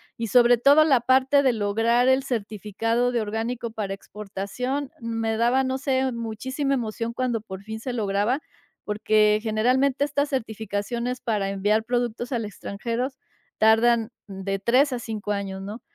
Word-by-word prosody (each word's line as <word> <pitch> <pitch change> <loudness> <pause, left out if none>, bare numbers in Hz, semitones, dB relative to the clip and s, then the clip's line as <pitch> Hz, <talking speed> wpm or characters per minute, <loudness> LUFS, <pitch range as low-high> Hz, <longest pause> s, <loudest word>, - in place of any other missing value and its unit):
y 230 - -3
sobre 240 +1 +5
todo, 285 +5 +6
la 265 -6 +4
parte 265 +3 +4
de 260 -3 +3
lograr 225 +3 +2
el 260 +1 +4
certificado 225 +1 -1
de 240 - 0
orgánico 225 +2 -3
para 205 -3 -4
exportación, 210 +8 -5
me 225 -1 -2
daba, 245 +3 +3
no 260 0 -2
sé, 265 -1 0
muchísima 260 +5 -2
emoción 230 -1 -3
cuando 240 -2 -1
por 190 -2 -9
fin 220 +1 -6
se 250 +2 -4
lograba, 210 +3 0 0.5
porque 210 0 +3
generalmente 255 +6 +2
estas 285 0 -1
certificaciones 235 0 -3
para 210 -4 -1
enviar 205 +3 +1
productos 240 0 -2
al 235 -4 -1
extranjero 230 +4 -3 0.5
tardan 225 +1 +4 0.2
de 195 0 -4
3 255 +7 +3
a 245 - -2
5 215 -3 -4
años, 195 -1 -3
¿no?, 210 +4 -7
230 Hz, 150 wpm, -24 LUFS, 210-255 Hz, 0.5 s, todo